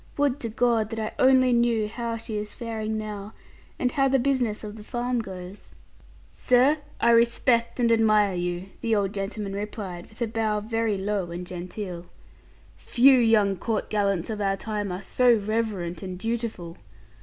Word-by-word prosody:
Would 285 -1 +1
to 230 - -4
God 225 -1 +1
that 225 -1 -4
I 215 0 -3
only 255 -1 +5
knew 235 -2 +2
how 230 +1 -4
she 220 -1 -6
is 210 0 -4
faring 220 -2 -3
now, 210 -1 -6 0.4
and 250 - 0
how 275 0 +2
the 270 0 +3
business 245 -5 0
of 210 0 -7
the 215 - -10
farm 245 +1 -2
goes!' 190 -1 -10 0.6
'Sir, 260 +5 +3 0.2
I 235 - +4
respect 235 +1 +2
and 235 -1 +3
admire 215 -3 +4
you,' 175 +1 -3
the 225 -1 +1
old 200 -1 0
gentleman 200 0 -4
replied, 200 -3 -6
with 215 - -18
a - - +2
bow 220 -1 -1
very 225 -1 -1
low 195 -2 -2
and 175 +1 -6
genteel; 180 0 -6 0.7
'few 260 +2 +5
young 215 -4 +3
court 220 +2 -2
gallants 200 -2 0
of 210 -1 -4
our 195 -1 +1
time 205 -1 -3
are 180 +2 -5
so 245 +3 +4
reverent 205 -5 -2
and 185 -1 -6
dutiful. 220 -6 -4
215 Hz, 170 wpm, -25 LUFS, 200-235 Hz, 0.7 s, only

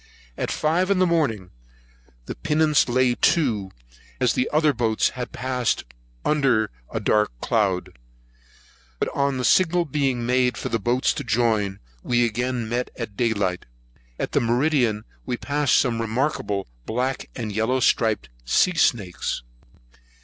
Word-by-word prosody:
At - - -3
five 170 +5 +1
in 200 - +3
the 185 - +4
morning, 130 - 0 0.7
the - - -5
pinnace 150 - +2
lay 125 0 +3
to, 115 - +1 0.5
as 125 -4 +2
the 125 - 0
other 150 -1 +3
boats 115 -3 +1
had 125 -1 -6
passed 125 -1 -1
her - - -23 0.4
under 135 - +2 0.2
a - - -2
dark 105 - +1
cloud; 100 - 0 1.0
but - - -1
on 140 -1 0
the 125 - -1
signal 175 -1 +3
being 135 -5 -1
made 125 0 +2
for - - -4
the 115 - 0
boats 120 +5 +1
to 145 - -5
join, 110 -5 +1 0.2
we 120 - +2
again 120 +1 -2
met 120 +2 -2
at 115 -4 -6
day 115 +1 +1
light. 95 -4 -2 0.5
At - - -4
meridian, 120 -2 +2 0.2
we 125 - -1
passed 145 0 +1
some 115 -3 +1
remarkable 110 -4 -1 0.2
black 125 +4 -2
and 110 -4 -4
yellow 110 +5 0
striped 110 - +2 0.2
sea 180 - +3
snakes. 95 - 0
120 Hz, 145 wpm, -23 LUFS, 110-140 Hz, 1.0 s, the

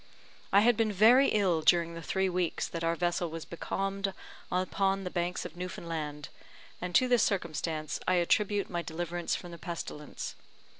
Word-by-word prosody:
I 200 - +6
had 240 +2 +5
been 225 -2 +2
very 230 +7 +6
ill 185 -6 +2
during 170 +1 +4
the 165 - -7
three 190 +3 0
weeks 180 -2 -1
that 165 -1 -5
our 165 0 +1
vessel 175 0 0
was 165 0 -6
becalmed 195 +3 -3 0.4
upon 195 +1 +1
the 180 - -4
Banks 175 0 -2
of 155 - -7
Newfoundland, 165 -4 -5 0.5
and 180 0 -3
to 255 - +5
this 245 -2 +4
circumstance 160 - -1
I 185 - +4
attribute 200 +3 +2
my 175 -2 -2
deliverance 170 +1 -3
from 175 - -7
the 170 - -9
pestilence. 155 -3 -6
175 Hz, 165 wpm, -30 LUFS, 170-195 Hz, 0.5 s, I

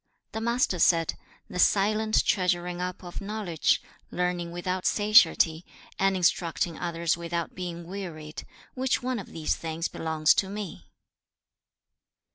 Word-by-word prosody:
The 220 - -4
Master 235 -5 +1
said, 165 -2 +4 0.3
'The 180 - -6
silent 215 +4 +3
treasuring 180 -2 0
up 180 0 -4
of 175 +2 -7
knowledge; 200 -6 0 0.3
learning 180 -1 -2
without 180 +1 -2
satiety; 205 -6 +4 0.4
and 195 0 +3
instructing 170 -1 0
others 170 -1 0
without 170 0 -3
being 175 -2 -6
wearied: 165 -5 -7 0.3
which 260 -1 0
one 255 -2 -1
of 195 - -8
these 160 -2 -1
things 165 +1 -3
belongs 160 0 +2
to 190 - 0
me?' 195 - -7
180 Hz, 125 wpm, -27 LUFS, 170-200 Hz, 0.4 s, said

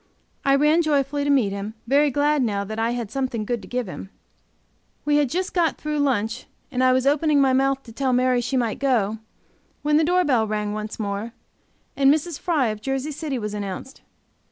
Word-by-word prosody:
I 275 0 +4
ran 300 +4 +4
joyfully 285 -2 0
to - - 0
meet 255 -8 +3
him, 200 +2 -5
very 285 +4 +3
glad 290 +2 +2
now 205 -5 0
that 215 +2 -6
I 225 +1 +1
had 235 -3 -3
something 255 -5 -2
good 240 -1 -2
to - - -12
give 250 -1 -2
him. 190 +1 -8 1.0
We 295 0 +3
had 290 -3 +2
just 365 +7 -2
got 335 -4 +1
through 300 0 -3
lunch, 240 -4 0 0.2
and 255 -1 0
I 255 - +5
was 260 0 +2
opening 295 +1 +3
my 270 -1 +4
mouth 270 +1 +1
to 230 - -12
tell 260 +3 -1
Mary 250 0 +2
she 245 +2 -1
might 235 -4 -1
go, 225 -6 +1 0.6
when 300 0 +3
the 320 - +4
door 360 +3 +3
bell 235 -6 +2
rang 210 -1 -2
once 215 0 -5
more, 205 +2 -3 0.6
and 275 0 +5
Mrs. 315 +1 -1
Fry, 305 -10 +1
of 215 -1 -5
Jersey 270 +4 -2
City, 295 -2 -4
was 210 -3 -4
announced. 205 +6 -6
260 Hz, 205 wpm, -23 LUFS, 220-290 Hz, 1.0 s, I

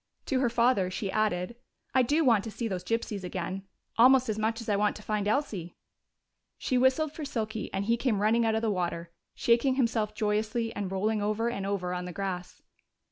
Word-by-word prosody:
To 265 - 0
her 255 -2 +2
father 235 -5 +2
she 190 +1 -3
added, 215 0 0 0.4
"I 260 - +5
do 295 +6 +2
want 225 -5 +4
to - - -4
see 230 +2 -3
those 185 -4 -3
gypsies 220 -1 -2
again, 185 +2 -4 0.3
almost 255 0 +6
as 215 0 -1
much 225 +1 0
as 230 - -8
I 210 - +2
want 210 +1 +1
to 210 - -10
find 210 -1 -1
Elsie." 205 - -1 0.8
She 255 - -1
whistled 260 +4 +3
for 310 - -6
Silky, 220 -6 -3
and 195 +1 -2
he 230 +2 +2
came 235 -4 0
running 220 +3 +3
out 220 -1 +2
of 220 - -1
the 220 - +2
water, 170 -2 -2 0.2
shaking 240 +3 +3
himself 225 -4 0
joyously 220 +2 -1
and 200 -2 -3
rolling 210 +3 0
over 215 +3 0
and 200 -4 -4
over 180 -3 -2
on 180 0 -3
the 180 - -6
grass. 185 -2 -5
215 Hz, 205 wpm, -29 LUFS, 195-235 Hz, 0.8 s, almost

